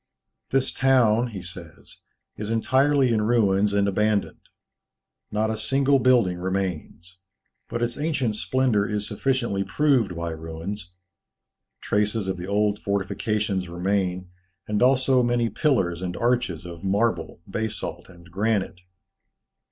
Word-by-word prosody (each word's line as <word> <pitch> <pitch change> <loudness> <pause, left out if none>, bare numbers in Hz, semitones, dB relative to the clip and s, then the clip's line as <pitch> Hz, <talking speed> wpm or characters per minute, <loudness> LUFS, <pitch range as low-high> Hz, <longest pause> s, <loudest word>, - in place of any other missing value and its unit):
"This 135 0 +1
town," 125 -3 +3
he 100 -6 -7
says, 90 -3 -10 0.3
"is 105 0 -5
entirely 130 +3 +3
in 110 - +2
ruins 105 -3 +2
and 100 0 +2
abandoned. 105 +1 -1 0.8
Not 110 +1 0
a - - -1
single 135 +5 +2
building 120 -9 +3
remains; 90 -1 -4 0.5
but 120 - -2
its 120 +2 -3
ancient 145 -8 0
splendour 115 -3 +1
is 105 -1 -2
sufficiently 120 -7 -1
proved 125 - +1
by 85 0 -3
ruins. 80 +4 -7 0.9
Traces 105 0 0
of 95 -1 -2
the 90 +1 -6
old 105 +1 +1
fortifications 100 -1 -1
remain, 90 0 -1 0.4
and 105 -1 -1
also 130 0 +4
many 120 -1 +1
pillars 90 - +1
and 90 -1 -4
arches 120 -9 0
of 85 0 -9
marble, 100 -4 0
basalt, 110 -4 -4
and 90 -1 -16
granite. 100 -2 -1
105 Hz, 125 wpm, -24 LUFS, 95-120 Hz, 0.9 s, also